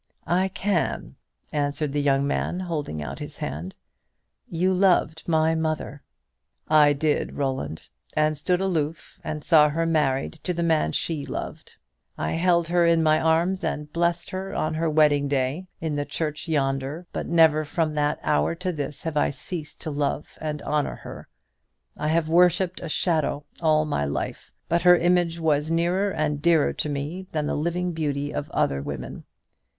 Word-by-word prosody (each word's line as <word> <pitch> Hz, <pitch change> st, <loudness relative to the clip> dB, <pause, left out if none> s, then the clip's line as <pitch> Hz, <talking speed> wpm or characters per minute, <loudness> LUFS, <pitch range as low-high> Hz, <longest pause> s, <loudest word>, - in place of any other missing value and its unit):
"I 185 Hz, +3 st, +2 dB
can," 190 Hz, -, -1 dB, 0.4 s
answered 145 Hz, 0 st, -1 dB
the 145 Hz, -, +1 dB
young 140 Hz, -1 st, +2 dB
man, 175 Hz, +5 st, -1 dB
holding 150 Hz, -, -3 dB
out -, -, -6 dB
his -, -, -7 dB
hand, 85 Hz, +6 st, -5 dB, 0.7 s
"you 180 Hz, +3 st, +1 dB
loved 180 Hz, -4 st, +2 dB
my 160 Hz, -1 st, +3 dB
mother." 155 Hz, -3 st, -2 dB, 0.7 s
"I 150 Hz, -1 st, +6 dB
did, 150 Hz, +1 st, 0 dB
Roland, 130 Hz, -, -3 dB, 0.3 s
and 155 Hz, 0 st, +3 dB
stood 180 Hz, +5 st, 0 dB
aloof 165 Hz, -4 st, -2 dB
and 150 Hz, -1 st, -4 dB
saw 150 Hz, -3 st, +6 dB
her 165 Hz, +3 st, 0 dB
married 150 Hz, -5 st, +1 dB
to 180 Hz, -, -2 dB
the 170 Hz, -, -1 dB
man 160 Hz, -2 st, +2 dB
she 155 Hz, -4 st, -2 dB
loved. -, -, -7 dB, 0.4 s
I -, -, -2 dB
held 170 Hz, 0 st, +2 dB
her 175 Hz, 0 st, +3 dB
in 165 Hz, -1 st, +4 dB
my 155 Hz, 0 st, +4 dB
arms 170 Hz, +4 st, +1 dB
and 150 Hz, -2 st, -3 dB
blessed 170 Hz, 0 st, 0 dB
her 190 Hz, +1 st, -4 dB
on 155 Hz, 0 st, 0 dB
her 160 Hz, +1 st, 0 dB
wedding 150 Hz, -2 st, +3 dB
day 140 Hz, +6 st, -1 dB
in 160 Hz, -2 st, -2 dB
the 145 Hz, -, 0 dB
church 155 Hz, +1 st, -3 dB
yonder; 140 Hz, +1 st, -1 dB
but -, -, -3 dB
never 160 Hz, -2 st, +5 dB
from 155 Hz, +1 st, -1 dB
that 150 Hz, 0 st, 0 dB
hour 155 Hz, +2 st, +1 dB
to 180 Hz, +2 st, -2 dB
this 145 Hz, -3 st, -5 dB
have 160 Hz, -2 st, -3 dB
I -, -, +3 dB
ceased 150 Hz, +2 st, -7 dB
to 155 Hz, -, -4 dB
love 145 Hz, 0 st, -2 dB
and 150 Hz, -1 st, -4 dB
honour 150 Hz, -1 st, -1 dB
her. -, -, -10 dB, 0.7 s
I 150 Hz, -, -3 dB
have 160 Hz, 0 st, +2 dB
worshipped 180 Hz, +2 st, +3 dB
a 170 Hz, -, -5 dB
shadow 155 Hz, -3 st, 0 dB, 0.2 s
all 155 Hz, -1 st, +3 dB
my 110 Hz, -, -1 dB
life; 70 Hz, -, -4 dB, 0.2 s
but 170 Hz, +1 st, +1 dB
her 180 Hz, 0 st, +7 dB
image 175 Hz, -1 st, +2 dB
was 155 Hz, -2 st, +1 dB
nearer 175 Hz, +4 st, +1 dB
and 150 Hz, -4 st, -1 dB
dearer 165 Hz, -2 st, +3 dB
to 150 Hz, -, -2 dB
me 150 Hz, +7 st, -4 dB
than 155 Hz, -2 st, -1 dB
the -, -, -1 dB
living 170 Hz, +4 st, -1 dB
beauty 145 Hz, -3 st, -2 dB
of 145 Hz, -, -4 dB
other 70 Hz, 0 st, 0 dB
women. 65 Hz, -3 st, -6 dB
155 Hz, 170 wpm, -25 LUFS, 145-170 Hz, 0.7 s, her